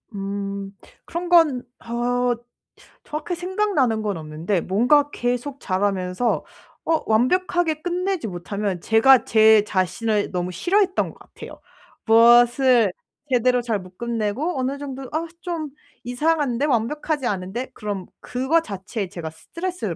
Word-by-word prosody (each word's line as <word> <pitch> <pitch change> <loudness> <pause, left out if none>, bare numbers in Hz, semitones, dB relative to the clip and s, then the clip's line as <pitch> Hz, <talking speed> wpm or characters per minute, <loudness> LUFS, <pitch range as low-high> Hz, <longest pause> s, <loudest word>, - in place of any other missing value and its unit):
음. 200 0 -4 0.3
그런 345 +1 -4
건 310 -8 +4 0.2
어 245 +1 0 0.7
정확히 310 +4 -4
생각나는 355 - 0
건 205 -4 -2
없는데 160 +4 -2
뭔가 250 +10 +3
계속 245 +3 -2
자라면서 190 +3 -1 0.4
어 325 -1 +2
완벽하게 320 +6 +2
끝내지 360 - -1
못하면 190 0 -4
제가 240 +3 +5
제 220 -1 +6
자신을 205 +2 -1
너무 180 0 -2
싫어했던 375 - +1
것 - - -20
같아요. - - -12 0.5
무엇을 240 0 +5 0.4
제대로 250 0 +3
잘 230 -3 -1
못 185 -1 -14
끝내고 235 +6 -2
어느 265 +2 -1
정도 270 -2 -6
'아 320 +2 -1 0.2
좀 330 -4 -4 0.3
이상한데 285 +1 0
완벽하지 280 +2 -1
않은데.' 200 +6 -3
그럼 205 -3 -5
그거 265 +7 +1
자체에 200 - -5
제가 170 -3 -6
스트레스를 335 - -5
240 Hz, 280 characters per minute, -22 LUFS, 200-300 Hz, 0.7 s, 제